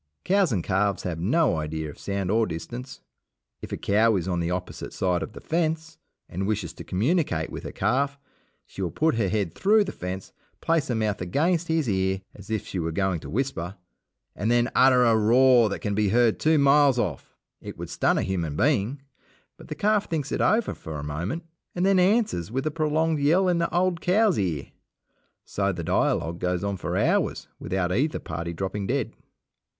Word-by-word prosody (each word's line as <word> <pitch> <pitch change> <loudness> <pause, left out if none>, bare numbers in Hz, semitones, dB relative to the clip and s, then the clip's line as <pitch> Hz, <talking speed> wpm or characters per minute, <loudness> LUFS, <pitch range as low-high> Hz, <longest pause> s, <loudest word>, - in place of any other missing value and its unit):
Cows 195 -4 +3
and 95 -6 0
calves 100 0 0
have 85 -3 -3
no 120 - +2
idea 80 0 -3
of 75 - -10
sound 100 -1 -2
or 110 +1 +2
distance. 120 +10 -7 0.6
If - - -8
a - - -2
cow 110 +2 +3
is 95 -2 -2
on 90 -2 -1
the 85 0 -1
opposite 90 0 -5
side 90 -2 0
of - - -6
the - - -9
fence, 160 -1 -2 0.3
and 95 +3 -3
wishes 100 -6 -2
to - - -9
communicate 105 - 0
with - - -6
her - - -5
calf, 140 +4 0 0.5
she - - -9
will 90 - -1
put 160 - +1
her 115 -5 0
head 100 -5 -1
through 210 - +4
the 195 - -5
fence, 90 +1 -6 0.3
place 165 -3 +1
her 120 - -1
mouth 110 -3 -1
against 165 - 0
his 160 -4 0
ear 95 -1 0
as 100 0 -14
if 110 -1 -2
she 95 - -4
were 80 -1 -2
going 95 0 0
to - - -10
whisper, 105 -7 -2 0.6
and 105 - -1
then 120 +1 +2
utter 130 -1 +5
a 115 -2 +4
roar 120 +1 +5
that - - -4
can 105 - -2
be 105 0 +1
heard 115 +1 +3
two 155 0 +3
miles 140 -2 +5
off. 90 - -3 0.3
It - - -8
would - - -7
stun - - +1
a - - +1
human 85 -6 -2
being; 130 - +1 0.5
but - - -14
the - - -5
calf 210 0 +1
thinks 150 -4 -2
it - - -1
over 220 +1 +2
for 80 -2 -7
a 70 - -6
moment, 85 - -4 0.3
and 180 +1 +1
then 195 -1 +4
answers 185 - +2
with 130 +3 -2
a 155 - 0
prolonged 155 0 0
yell 170 +7 +3
in 175 -2 +2
the 170 - 0
old 175 -1 +1
cow's 195 - +3
ear. 85 -8 -2 0.7
So - - -1
the - - -5
dialogue 85 +1 0
goes 90 +1 -1
on 100 -1 -2
for - - -3
hours - - +1
without 95 -2 -1
either 140 +11 +1
party 85 +2 -5
dropping 95 +3 -4
dead. - - -1
110 Hz, 200 wpm, -25 LUFS, 90-155 Hz, 0.7 s, utter